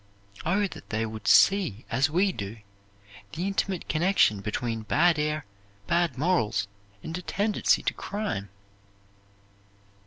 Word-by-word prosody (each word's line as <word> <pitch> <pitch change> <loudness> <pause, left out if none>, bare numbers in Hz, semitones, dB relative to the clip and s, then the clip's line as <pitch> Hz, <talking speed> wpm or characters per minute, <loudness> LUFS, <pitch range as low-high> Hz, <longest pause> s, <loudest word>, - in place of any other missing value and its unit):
Oh, 200 +4 +2
that - - -12
they 110 0 -1
would 110 -2 -7
see, 180 - +4
as 130 +6 +2
we 185 +6 +2
do, 105 - -6 0.8
the 175 - -3
intimate 195 -2 -2
connection 155 - +2
between 115 +2 -3
bad 155 +8 +3
air, 150 0 -1 0.4
bad 170 -4 +1
morals, 140 - +1 0.4
and 160 - -5
a - - -8
tendency 205 +3 +1
to - - 0
crime! 200 - -4
155 Hz, 125 wpm, -27 LUFS, 110-185 Hz, 0.8 s, see